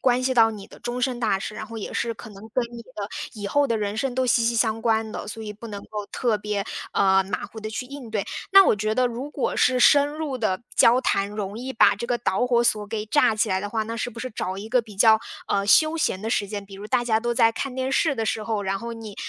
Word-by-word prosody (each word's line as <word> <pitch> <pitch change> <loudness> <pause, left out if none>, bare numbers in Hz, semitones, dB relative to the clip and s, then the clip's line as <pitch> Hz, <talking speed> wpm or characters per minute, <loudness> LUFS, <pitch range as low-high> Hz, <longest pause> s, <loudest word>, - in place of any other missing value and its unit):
关 250 0 +2
系 260 +1 +1
到 225 -3 +5
你 205 -3 -9
的 - - -15
终 245 +1 -4
身 250 -1 -1
大 215 -5 +1
事， 210 +2 -6
然 215 - -6
后 230 - -9
也 215 - -6
是 235 -1 -1
可 215 - -11
能 205 +2 -12
跟 255 - +2
你 235 0 -8
的 215 -4 -7 0.3
以 205 -2 -5
后 285 +7 +2
的 230 -3 0
人 205 -1 -2
生 255 +2 -1
都 260 0 +1
息 240 -1 +3
息 235 +1 +1
相 225 -1 +1
关 220 -1 0
的， - - -6
所 225 +1 -6
以 210 -1 -6
不 215 +3 -11
能 205 -2 -6
够 210 -1 -6
特 230 -4 0
别， 210 -1 -2 0.3
呃， 190 -1 +4
马 195 - -3
虎 220 - -9
地 215 - -5
去 220 +4 -4
应 270 -3 -9
对。 210 -2 -1 0.3
那 390 0 +9
我 - - +4
觉 215 +1 -1
得 255 +1 +3
如 245 +4 -5
果 285 - -2
是 255 0 +3
深 285 +3 +6
入 295 -3 -4
的 215 -3 -1
交 235 +2 +6
谈， 200 -5 +1
容 210 0 -5
易 260 +2 -5
把 - - +5
这 235 - -5
个 245 0 +1
导 235 0 0
火 240 -1 +2
索 210 -3 +2
给 215 0 -4
炸 220 0 +3
起 215 -1 +1
来 190 0 +1
的 205 - -4
话， 220 +1 -1
那 225 +1 -5
是 225 - -2
不 235 -1 -10
是 255 +2 -5
找 185 -2 -3
一 205 +3 -7
个 250 0 +4
比 215 -3 -14
较， 220 +1 +6 0.3
呃， 200 0 0
休 310 +9 +5
闲 190 -11 0
的 220 - -3
时 205 -3 0
间， 205 -1 -5
比 195 0 -12
如 200 +2 -8
大 245 +2 +1
家 220 -2 +2
都 240 +1 -1
在 230 -2 +4
看 260 +2 -4
电 260 0 -2
视 295 +2 +2
的 225 - -2
时 220 0 -1
候， 215 -2 -2
然 195 0 -1
后 235 +1 -6
你， 220 -3 -9
225 Hz, 310 characters per minute, -24 LUFS, 210-245 Hz, 0.3 s, 那